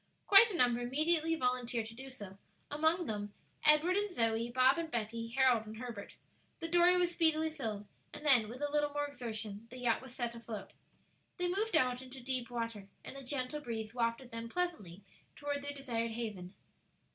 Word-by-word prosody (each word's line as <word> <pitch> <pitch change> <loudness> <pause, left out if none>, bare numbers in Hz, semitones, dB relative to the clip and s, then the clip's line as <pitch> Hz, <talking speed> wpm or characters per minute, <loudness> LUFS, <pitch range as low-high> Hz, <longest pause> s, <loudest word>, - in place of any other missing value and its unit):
Quite 410 +4 +8
a 380 - -3
number 245 -4 +4
immediately 310 +6 +1
volunteered 250 -4 -1
to 225 - -9
do 265 +3 -9
so, 205 -7 -10 0.3
among 320 +4 +2
them 205 -3 -4 0.3
Edward 305 +4 +5
and 415 0 0
Zoe, 230 - 0
Bob 255 +5 +4
and 330 -1 -3
Betty, 230 -2 -3
Harold 250 -5 +4
and 215 +1 -8
Herbert. 230 -4 -7 0.4
The 330 - -3
dory 350 +1 +5
was 355 -1 +2
speedily 320 -2 +2
filled, 220 -9 -4 0.3
and 300 - -9
then, 245 -7 +6
with 255 +5 -7
a 290 - -1
little 295 0 +2
more 290 0 0
exertion 225 -6 -6
the 255 - -10
yacht 240 -2 +1
was 260 -1 -11
set 240 -2 -2
afloat. 230 -3 -8 0.6
They 355 -1 0
moved 405 +2 0
out 250 -3 +1
into 260 0 -10
deep 255 -1 -2
water, 230 -4 -4 0.2
and - - -8
a 275 - -7
gentle 260 +2 -2
breeze 225 -5 -5
wafted 240 +1 -1
them 230 0 -5
pleasantly 215 - -3 0.3
toward 285 -1 -3
their 285 0 -4
desired 245 -5 -3
haven. 215 -5 -6
255 Hz, 185 wpm, -34 LUFS, 230-300 Hz, 0.6 s, Quite